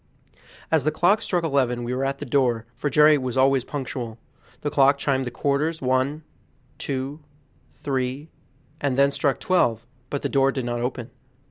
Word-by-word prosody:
As 160 Hz, -4 st, +3 dB
the 155 Hz, -, +2 dB
clock 175 Hz, +7 st, +2 dB
struck 180 Hz, -5 st, -1 dB
eleven 130 Hz, -6 st, 0 dB
we 120 Hz, +1 st, -3 dB
were 130 Hz, +1 st, -1 dB
at 135 Hz, 0 st, -1 dB
the 145 Hz, -, -6 dB
door, 120 Hz, -4 st, +1 dB
for 145 Hz, +4 st, -2 dB
Jerry 150 Hz, +1 st, +5 dB
was 130 Hz, -1 st, -3 dB
always 135 Hz, -1 st, +4 dB
punctual. 125 Hz, -5 st, -5 dB, 0.4 s
The 145 Hz, -, -2 dB
clock 140 Hz, 0 st, +4 dB
chimed 135 Hz, -2 st, 0 dB
the -, -, -1 dB
quarters, 145 Hz, +6 st, -1 dB
one, 130 Hz, +4 st, 0 dB, 0.6 s
two, 135 Hz, +2 st, -4 dB, 0.6 s
three, 135 Hz, +2 st, -2 dB, 0.5 s
and 140 Hz, -3 st, -1 dB
then 140 Hz, 0 st, +4 dB
struck 140 Hz, -1 st, 0 dB
twelve, 120 Hz, -11 st, +1 dB, 0.2 s
but 140 Hz, -, -3 dB
the -, -, +1 dB
door 135 Hz, -1 st, +2 dB
did 130 Hz, -3 st, -3 dB
not 120 Hz, 0 st, -2 dB
open. 125 Hz, -1 st, -4 dB
135 Hz, 170 wpm, -24 LUFS, 125-145 Hz, 0.6 s, Jerry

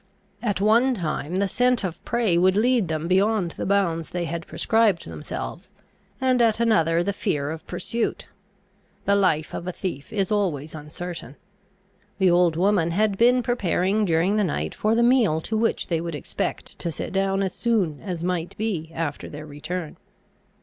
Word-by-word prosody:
At 205 Hz, -5 st, -1 dB
one 235 Hz, +6 st, +4 dB
time 165 Hz, -3 st, -3 dB
the 200 Hz, +1 st, +2 dB
scent 250 Hz, +2 st, +2 dB
of 175 Hz, -3 st, -4 dB
prey 230 Hz, -7 st, +1 dB
would 185 Hz, +2 st, +4 dB
lead 235 Hz, -1 st, +3 dB
them 160 Hz, +1 st, -2 dB
beyond 190 Hz, 0 st, +2 dB
the -, -, -5 dB
bounds 175 Hz, -5 st, +1 dB
they 175 Hz, -1 st, -2 dB
had 170 Hz, 0 st, -5 dB
prescribed 220 Hz, -6 st, +2 dB
themselves, 80 Hz, -2 st, -6 dB, 0.5 s
and 255 Hz, -2 st, +2 dB
at 225 Hz, -1 st, +3 dB
another 170 Hz, -8 st, +3 dB
the 200 Hz, +2 st, -1 dB
fear 150 Hz, -8 st, -1 dB
of 160 Hz, 0 st, -8 dB
pursuit: 230 Hz, -1 st, -2 dB, 0.8 s
the 200 Hz, -, +3 dB
life 165 Hz, -6 st, +1 dB
of 175 Hz, -, -5 dB
a -, -, -1 dB
thief 170 Hz, -5 st, -5 dB
is 200 Hz, -3 st, -1 dB
always 165 Hz, -8 st, -1 dB
uncertain. 155 Hz, -2 st, -7 dB, 0.8 s
The 190 Hz, -3 st, +4 dB
old 175 Hz, -2 st, +4 dB
woman 180 Hz, -1 st, +2 dB
had 205 Hz, +4 st, +1 dB
been 245 Hz, +4 st, +4 dB
preparing 205 Hz, -3 st, +1 dB
during 180 Hz, +3 st, +2 dB
the 210 Hz, -, +3 dB
night 80 Hz, -, -2 dB
for 215 Hz, +1 st, +1 dB
the 235 Hz, -, +3 dB
meal 235 Hz, -10 st, +4 dB
to 220 Hz, -, -3 dB
which 225 Hz, +1 st, +1 dB
they 165 Hz, -3 st, -1 dB
would 170 Hz, -2 st, -4 dB
expect 145 Hz, -, -4 dB
to 170 Hz, -, -2 dB
sit -, -, -5 dB
down 195 Hz, 0 st, +1 dB
as 190 Hz, -, -2 dB
soon 195 Hz, -, 0 dB
as 180 Hz, -4 st, -4 dB
might 175 Hz, -1 st, -2 dB
be 195 Hz, -8 st, -2 dB
after 160 Hz, -3 st, -3 dB
their 150 Hz, +1 st, -8 dB
return. 155 Hz, +3 st, -6 dB
185 Hz, 175 wpm, -24 LUFS, 165-215 Hz, 0.8 s, one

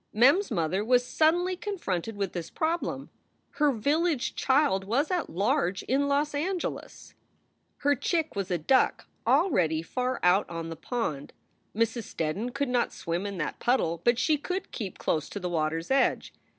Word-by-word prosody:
Mem 250 Hz, -, +6 dB
s 405 Hz, -, -4 dB
mother 170 Hz, +4 st, 0 dB
was 245 Hz, +2 st, +3 dB
suddenly 350 Hz, +6 st, +2 dB
confronted 225 Hz, -, -3 dB
with 200 Hz, -2 st, -3 dB
this 170 Hz, -3 st, -5 dB
problem. 330 Hz, +2 st, -2 dB, 0.5 s
Her 295 Hz, -1 st, +4 dB
village 290 Hz, +4 st, 0 dB
child 265 Hz, -8 st, +2 dB
was 255 Hz, -, 0 dB
at 360 Hz, -2 st, -1 dB
large 200 Hz, -, 0 dB
in 280 Hz, +3 st, +1 dB
Los 290 Hz, +1 st, +1 dB
Angeles! 345 Hz, +5 st, -4 dB, 0.6 s
Her 285 Hz, 0 st, +2 dB
chick 320 Hz, +2 st, -1 dB
was 195 Hz, -2 st, -2 dB
a 180 Hz, -, +1 dB
duck, 260 Hz, -, +2 dB, 0.2 s
already 165 Hz, -, +3 dB
far 255 Hz, +8 st, -2 dB
out 180 Hz, +3 st, +4 dB
on 165 Hz, -1 st, -5 dB
the 165 Hz, -, -5 dB
pond! 155 Hz, -, -4 dB, 0.4 s
Mrs. 230 Hz, 0 st, 0 dB
Steddon 185 Hz, +10 st, -2 dB
could 280 Hz, +1 st, -2 dB
not 245 Hz, -1 st, +1 dB
swim 170 Hz, +4 st, -3 dB
in 200 Hz, -2 st, -5 dB
that 150 Hz, -3 st, -3 dB
puddle, 170 Hz, -10 st, +1 dB
but 240 Hz, 0 st, +3 dB
she 290 Hz, +5 st, +2 dB
could 370 Hz, +5 st, -4 dB
keep 200 Hz, -6 st, -5 dB
close 155 Hz, -2 st, -1 dB
to 205 Hz, -, -5 dB
the 180 Hz, -2 st, -3 dB
water 160 Hz, -1 st, 0 dB
s 165 Hz, +9 st, -6 dB
edge. 270 Hz, -, +2 dB
240 Hz, 170 wpm, -28 LUFS, 180-290 Hz, 0.6 s, Mem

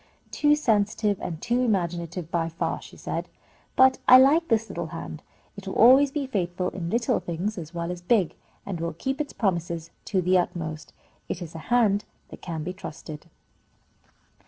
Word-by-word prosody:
"Too 295 Hz, 0 st, +3 dB
sensitive 210 Hz, -6 st, +1 dB
and 165 Hz, -3 st, -4 dB
too 240 Hz, +5 st, 0 dB
imaginative 175 Hz, -6 st, -1 dB
by 165 Hz, -1 st, 0 dB
far," 165 Hz, -, -3 dB
she -, -, -13 dB
said. -, -, -4 dB, 0.5 s
"But 260 Hz, 0 st, +5 dB
I 255 Hz, -, +10 dB
like 295 Hz, +6 st, +5 dB
this 225 Hz, -1 st, +1 dB
little 170 Hz, -5 st, -4 dB
hand. 160 Hz, -1 st, -7 dB, 0.3 s
It 200 Hz, -1 st, -10 dB
will 190 Hz, -, -4 dB
always 265 Hz, +5 st, +7 dB
be 285 Hz, -1 st, -2 dB
faithful 180 Hz, -6 st, -2 dB
in 170 Hz, -3 st, -5 dB
little 235 Hz, +3 st, +1 dB
things 180 Hz, +6 st, -3 dB
as 170 Hz, -1 st, -8 dB
well 170 Hz, +1 st, -2 dB
as 180 Hz, -1 st, -6 dB
big, 185 Hz, -1 st, +2 dB, 0.3 s
and 190 Hz, -4 st, -4 dB
will 170 Hz, 0 st, -2 dB
keep 265 Hz, -, -2 dB
its 295 Hz, -, -4 dB
promises 170 Hz, -5 st, -2 dB
to 195 Hz, -, 0 dB
the 185 Hz, +1 st, +3 dB
utmost. 160 Hz, -3 st, -4 dB, 0.4 s
It 175 Hz, -, -3 dB
is 170 Hz, -3 st, -8 dB
a 165 Hz, -, -7 dB
hand 215 Hz, -4 st, +3 dB, 0.2 s
that -, -, -11 dB
can 165 Hz, -3 st, -4 dB
be 180 Hz, +3 st, -4 dB
trusted." 155 Hz, -3 st, -9 dB
185 Hz, 180 wpm, -26 LUFS, 170-235 Hz, 0.5 s, I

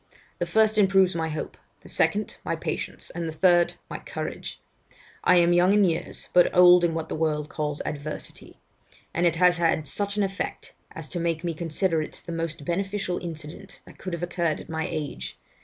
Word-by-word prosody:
The -, -, -1 dB
first 220 Hz, -1 st, +3 dB
improves 190 Hz, -2 st, +5 dB
my 165 Hz, -1 st, -1 dB
hopes; 155 Hz, 0 st, -5 dB, 0.2 s
the -, -, -14 dB
second, -, -, 0 dB
my -, -, -1 dB
patience; -, -, -5 dB
and 170 Hz, -1 st, -4 dB
the -, -, -3 dB
third, 175 Hz, +1 st, +3 dB
my -, -, -6 dB
courage. -, -, -6 dB, 0.6 s
I 180 Hz, -, +5 dB
am 175 Hz, 0 st, +5 dB
young 180 Hz, +3 st, +5 dB
in 210 Hz, -, +5 dB
years, 165 Hz, -2 st, -3 dB
but 175 Hz, -1 st, +6 dB
old 180 Hz, 0 st, +8 dB
in 165 Hz, -1 st, +2 dB
what 160 Hz, -1 st, -3 dB
the -, -, -5 dB
world 155 Hz, -2 st, -1 dB
calls 150 Hz, -1 st, -3 dB
adversity; 150 Hz, +1 st, -6 dB, 0.5 s
and 175 Hz, +1 st, +3 dB
it 170 Hz, -, +1 dB
has 175 Hz, 0 st, +4 dB
had 165 Hz, -2 st, +2 dB
such 200 Hz, +6 st, -1 dB
an 205 Hz, -, +3 dB
effect, 195 Hz, -1 st, -4 dB, 0.2 s
as 160 Hz, -1 st, -7 dB
to 175 Hz, -, -3 dB
make 165 Hz, -1 st, -1 dB
me 170 Hz, -1 st, -1 dB
consider 165 Hz, +1 st, 0 dB
it 155 Hz, -, -6 dB
the 170 Hz, -, -6 dB
most 165 Hz, -3 st, -4 dB
beneficial 195 Hz, +1 st, -1 dB
incident 160 Hz, -3 st, -8 dB
that -, -, -16 dB
could 185 Hz, -, -5 dB
have 170 Hz, 0 st, -3 dB
occurred 170 Hz, -2 st, -1 dB
at -, -, -11 dB
my 160 Hz, -1 st, -2 dB
age. 155 Hz, -4 st, -5 dB
170 Hz, 195 wpm, -26 LUFS, 160-180 Hz, 0.6 s, old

